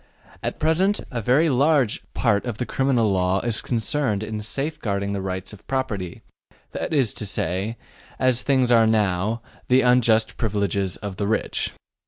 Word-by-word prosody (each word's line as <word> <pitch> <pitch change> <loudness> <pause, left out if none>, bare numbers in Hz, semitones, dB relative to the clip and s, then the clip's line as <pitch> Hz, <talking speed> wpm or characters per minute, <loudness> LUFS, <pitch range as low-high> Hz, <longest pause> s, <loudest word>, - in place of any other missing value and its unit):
At - - -3
present 185 +6 +2
a 120 -2 -2
very 130 +9 +3
large 140 -3 +2
part 105 -5 +2
of 120 -4 -4
the 125 - -2
criminal 125 -6 +1
law 95 0 +1
is 120 -2 -1
concerned 115 -2 0
in 110 0 -4
safeguarding 105 -6 -2
the 100 - -2
rights 95 +1 -4
of 105 - -15
property, 105 -10 -3 0.5
that - - -4
is 135 -9 +2
to 105 - -3
say 95 +5 -2 0.4
as 130 -1 +2
things 130 -3 +2
are 115 -2 +6
now 105 +1 +1 0.2
the 130 +1 +5
unjust 115 -3 +3
privileges 100 -3 -1
of 100 -3 -6
the 100 - -1
rich. 110 - -1
110 Hz, 160 wpm, -23 LUFS, 100-130 Hz, 0.5 s, are